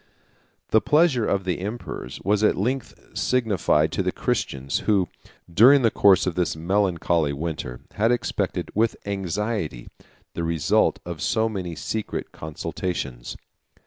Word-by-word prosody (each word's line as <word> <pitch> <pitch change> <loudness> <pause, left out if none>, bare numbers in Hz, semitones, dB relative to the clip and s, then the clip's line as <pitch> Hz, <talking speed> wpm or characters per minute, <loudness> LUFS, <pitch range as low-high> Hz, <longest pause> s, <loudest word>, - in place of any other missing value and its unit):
] - - -41
The 110 - +5
pleasure 150 -7 +3
of 100 -1 0
the 90 -2 -2
emperors 100 - -6
was 105 +2 +2
at 105 - +3
length 125 +7 -2 0.2
signified 115 -7 +1
to - - -1
the - - 0
Christians, 70 0 -2
who, 95 -5 +1 0.4
during 130 +8 +7
the 115 - +4
course 95 -2 +5
of 90 - 0
this 90 -1 0
melancholy 85 -3 +1
winter, 70 -5 -5
had 110 +3 +2
expected, 120 - -1
with 115 +2 +2
anxiety, 100 - -3 0.4
the 85 - -3
result 80 -3 +2
of - - -6
so 110 0 +1
many 95 -6 -4
secret 110 +6 -4
consultations. 75 -5 -5
95 Hz, 140 wpm, -24 LUFS, 85-110 Hz, 0.4 s, during